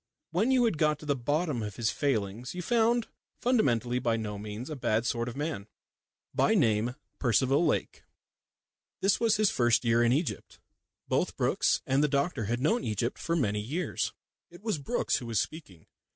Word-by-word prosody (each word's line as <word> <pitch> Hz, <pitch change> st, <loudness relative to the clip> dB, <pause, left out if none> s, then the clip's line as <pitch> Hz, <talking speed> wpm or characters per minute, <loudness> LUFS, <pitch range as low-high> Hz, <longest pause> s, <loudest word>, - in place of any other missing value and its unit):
When 195 Hz, +9 st, +1 dB
you 255 Hz, -2 st, +4 dB
had 185 Hz, -10 st, 0 dB
got 150 Hz, -1 st, +3 dB
to 150 Hz, -, -12 dB
the 145 Hz, -1 st, +1 dB
bottom 145 Hz, +1 st, -1 dB
of 105 Hz, -2 st, -5 dB
his 115 Hz, -3 st, 0 dB
failings 120 Hz, -, -2 dB
you 180 Hz, -, -4 dB
found 235 Hz, +2 st, +2 dB, 0.3 s
fundamentally 125 Hz, -, +2 dB
by 115 Hz, -2 st, +1 dB
no 105 Hz, -2 st, -4 dB
means 105 Hz, +7 st, -6 dB
a -, -, -3 dB
bad 115 Hz, -3 st, 0 dB
sort 120 Hz, 0 st, -1 dB
of 120 Hz, -, -8 dB
man, 145 Hz, -8 st, -3 dB, 0.7 s
by 220 Hz, -, +3 dB
name 115 Hz, -, +2 dB, 0.2 s
Percival 130 Hz, +5 st, +3 dB
Lake. -, -, -1 dB, 1.0 s
This 195 Hz, +1 st, +3 dB
was 225 Hz, -2 st, +3 dB
his 215 Hz, -2 st, +3 dB
first 120 Hz, 0 st, +2 dB
year 115 Hz, 0 st, +3 dB
in 120 Hz, 0 st, +4 dB
Egypt. 150 Hz, +5 st, -2 dB, 0.5 s
Both -, -, 0 dB
Brookes -, -, +1 dB
and 135 Hz, +2 st, +2 dB
the -, -, +4 dB
doctor 140 Hz, -, 0 dB
had 120 Hz, +4 st, -1 dB
known 220 Hz, -, +2 dB
Egypt 110 Hz, +2 st, -2 dB
for 165 Hz, -, -1 dB
many 105 Hz, -10 st, 0 dB
years. 155 Hz, +10 st, -2 dB, 0.4 s
It 175 Hz, +3 st, -15 dB
was 215 Hz, -9 st, -1 dB
Brookes 140 Hz, -, 0 dB
who 120 Hz, -, -6 dB
was 115 Hz, -4 st, 0 dB
speaking. 100 Hz, -, -6 dB
135 Hz, 180 wpm, -29 LUFS, 115-170 Hz, 1.0 s, you